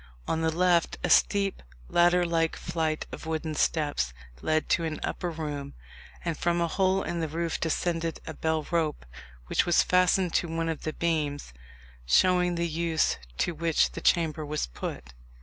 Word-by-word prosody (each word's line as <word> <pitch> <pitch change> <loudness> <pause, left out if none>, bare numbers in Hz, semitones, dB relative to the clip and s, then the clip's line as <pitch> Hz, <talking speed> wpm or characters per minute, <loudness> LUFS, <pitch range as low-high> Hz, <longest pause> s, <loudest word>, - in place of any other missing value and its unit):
On 160 - 0
the 160 - +2
left 175 +1 +2
a - - +1
steep 200 -1 +3 0.3
ladder 175 +1 +4
like 165 -1 +1
flight 160 -2 -2
of - - -8
wooden 160 -1 -2
steps 145 - 0 0.3
led 155 0 +1
to 170 - +2
an 160 -1 -3
upper 175 - -2
room, 150 -4 -5 0.5
and 165 -2 -1
from 170 +2 0
a 170 - +1
hole 190 +2 +1
in 170 - -3
the 160 - -1
roof 165 +2 -2
descended 165 0 -1
a - - -5
bell 160 -1 -1
rope, 160 - 0 0.4
which - - +1
was 175 - +5
fastened 180 -1 +3
to 175 - +1
one 165 0 -2
of 160 - -4
the 155 - -2
beams, 150 - -1 0.5
showing 180 - +4
the 170 0 0
use 165 -1 0 0.2
to - - +1
which 165 0 +2
the - - -7
chamber 160 -2 +2
was 150 +1 -2
put. - - -7
165 Hz, 170 wpm, -28 LUFS, 155-175 Hz, 0.5 s, was